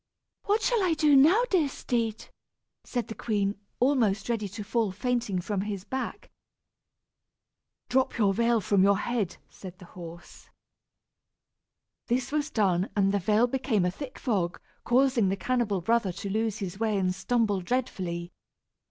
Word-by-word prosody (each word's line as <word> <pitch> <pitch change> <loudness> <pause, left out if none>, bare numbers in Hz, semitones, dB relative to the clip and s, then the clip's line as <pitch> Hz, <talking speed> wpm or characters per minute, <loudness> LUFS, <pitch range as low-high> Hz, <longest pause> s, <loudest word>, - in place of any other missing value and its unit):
"What 420 +2 +1
shall 475 -3 +2
I 345 -3 +2
do 305 -2 +4
now, 325 - +6
dear 330 -7 +3
steed?" 230 -4 -2 0.6
said 245 -3 -3
the 225 - -5
queen, 205 -3 -1 0.2
almost 235 -6 +2
ready 220 -3 -1
to 205 +2 -7
fall 220 -1 0
fainting 235 -2 -1
from 190 +2 -2
his 200 -2 -4
back. 260 +6 -5 1.6
"Drop 265 +1 +1
the 210 -4 +3
veil 230 +2 +2
from 195 0 +2
your 200 +1 +5
head," 215 -5 -2
said 185 -2 -11
the 180 - -13
horse. 170 -1 -11 1.6
This 245 +2 0
was 300 0 0
done, 190 - +1
and 195 -1 +3
the 200 - +1
veil 210 +5 +3
became 245 -6 0
a 180 - +1
thick 265 +6 -8
fog, 190 -9 -1 0.3
causing 250 -4 +3
the 195 - -1
cannibal 225 -4 0
brother 225 +1 +1
to 195 +2 -5
lose 220 0 0
his 195 -2 -5
way 220 -2 +1
and 185 -1 +1
stumble 215 -2 0
dreadfully. 180 -6 -3
215 Hz, 150 wpm, -28 LUFS, 195-250 Hz, 1.6 s, now